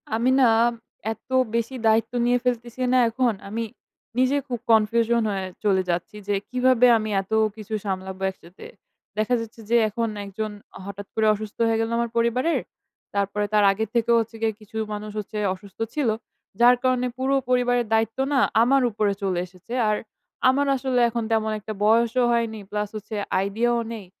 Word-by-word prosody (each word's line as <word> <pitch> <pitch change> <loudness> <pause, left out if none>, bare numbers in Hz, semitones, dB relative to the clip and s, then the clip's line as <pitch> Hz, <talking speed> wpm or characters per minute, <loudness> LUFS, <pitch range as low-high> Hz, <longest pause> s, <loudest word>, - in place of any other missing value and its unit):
আমি 235 +3 +2
না, 250 - +6 0.6
এত - - -26 0.3
বেশি 235 +2 -1
দায়িত্ব 220 +1 +3
নিয়ে 245 +1 +3
ফেলতেছি 240 0 -2
না - - +5
এখন। 240 0 +1 0.2
আমি 225 +3 -2 0.5
নিজে 255 +2 +3
খুব 245 -3 -3
কনফিউশন 230 +2 +3
হয়ে 195 -1 -2 0.2
চলে 195 -3 +3
যাচ্ছি। 175 +4 -2
যে 205 - +1 0.2
কিভাবে 250 0 +4
আমি 215 -1 -3
এত 195 - -17 0.2
কিছু 215 0 -8
সামলাবো 190 -1 -4
একসাথে। 180 0 -15 0.5
দেখা 215 +3 +2
যাচ্ছে 225 0 -9
যে, 235 - +3
এখন 230 +2 -1 0.2
একজন 215 +2 -4 0.3
হঠাৎ 200 0 -7
করে 220 - +2
অসুস্থ 215 0 -7
হয়ে 225 0 +1
গেল 225 - -1
আমার 235 0 0
পরিবারের। 250 +8 +2 0.6
তারপরে 200 +1 0
তার 210 -1 +5
আগের 215 +2 -2
থেকেও 235 0 +3
হচ্ছে 225 +1 -7
গিয়ে 225 -1 +1
কিছু 215 +1 -10 0.2
মানুষ 210 0 -5
হচ্ছে 210 +1 -6 0.2
অসুস্থ 190 0 -17
ছিল। 290 -6 +1 0.5
যার 245 +1 +7
কারণে 255 -1 +2
পুরো 265 +1 +1
পরিবারের 245 -1 +2
দায়িত্ব 225 +1 +1 0.2
না 270 - +4 0.2
আমার 270 +3 +4
উপরে 205 -1 +1
চলে 185 -3 0
এসেছে। 185 +6 -12 0.2
আর 210 - +2 0.5
আমার 280 +2 +2
আসলে 260 -1 0
এখন 235 0 -2
তেমন 220 -1 +1
একটা 215 +1 -6
বয়সও 230 +3 +3
হয়নি। 230 -2 -1
প্লাস 210 0 -2
হচ্ছে 215 +1 -6 0.2
আইডিয়াও 230 +5 +1
নেই। 215 -4 -8
225 Hz, 170 wpm, -24 LUFS, 210-240 Hz, 0.6 s, যার